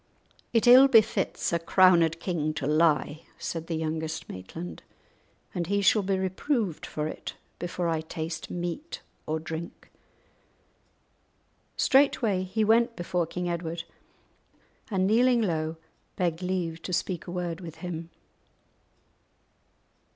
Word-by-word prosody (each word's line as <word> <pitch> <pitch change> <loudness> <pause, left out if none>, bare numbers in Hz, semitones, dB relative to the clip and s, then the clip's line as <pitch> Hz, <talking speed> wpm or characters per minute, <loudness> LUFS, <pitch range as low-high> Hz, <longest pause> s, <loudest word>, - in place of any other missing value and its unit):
"It 230 0 +3
ill 255 +3 +9
befits 225 -8 +2
a 170 - +2
crowned 170 -2 +4
king 155 -4 -2
to 135 - -3
lie," 155 0 +2 0.2
said 165 -1 -5
the 165 - -2
youngest 160 0 -3
Maitland, 160 - -8 0.7
"and 175 -3 -2
he 200 +1 +1
shall 210 +2 +5
be 195 0 0
reproved 190 - -1
for 150 0 -3
it - - -7 0.2
before 175 0 -2
I 165 -1 0
taste 160 0 -5
meat 175 - -5 0.2
or 155 +1 -1
drink." 160 +1 -7 1.9
Straightway 255 -8 +3
he 190 +4 -1
went 230 +2 +3
before 175 -1 -1
King 180 +2 -4
Edward, 170 -1 -3 1.1
and, 190 -3 +1
kneeling 235 +3 +4
low, 160 -4 -1 0.4
begged 170 -2 -1
leave 180 -3 -2
to 180 - -5
speak 175 -1 -2
a - - -5
word 175 -1 -3
with 165 -3 -8
him. 165 -1 -5
175 Hz, 125 wpm, -27 LUFS, 160-195 Hz, 1.9 s, ill